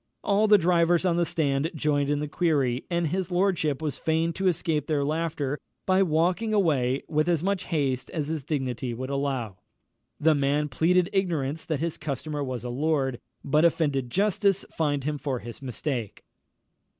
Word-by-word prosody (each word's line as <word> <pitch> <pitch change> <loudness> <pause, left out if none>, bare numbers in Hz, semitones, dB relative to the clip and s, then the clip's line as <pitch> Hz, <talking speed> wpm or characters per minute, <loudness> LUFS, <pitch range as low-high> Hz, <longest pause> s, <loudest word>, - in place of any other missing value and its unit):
All 205 +2 +3
the 210 0 +7
drivers 175 0 +3
on 170 -2 +2
the 170 -1 +2
stand 145 -1 0
joined 145 -2 +1
in 145 - +1
the 150 - -2
query, 140 -6 0
and 170 -1 0
his 185 +3 -1
lordship 175 -6 +1
was 150 -3 -3
fain 160 +1 0
to 190 +2 -1
escape 160 -4 0
their 145 -3 +1
laughter 150 -2 -2 0.3
by 185 0 +3
walking 180 +6 +1
away 140 -9 +2
with 155 +2 +1
as 170 -2 +1
much 195 -1 0
haste 135 -6 -1
as 150 -4 -3
his 155 -2 -3
dignity 130 -4 -2
would 130 +3 -5
allow. 135 -8 -2 0.6
The 160 +1 +4
man 145 +1 +1
pleaded 175 +7 +2
ignorance 165 -6 -1
that 155 -3 -2
his 165 -1 -2
customer 150 +1 -3
was 130 -4 -4
a 125 - -4
lord, 135 -1 0 0.2
but 150 +3 +2
offended 145 -6 +1
justice 200 - +1
fined 145 -4 -1
him 150 +1 -2
for 135 -3 -2
his 120 +1 -9
mistake. 125 -3 -4
155 Hz, 175 wpm, -26 LUFS, 140-170 Hz, 0.6 s, the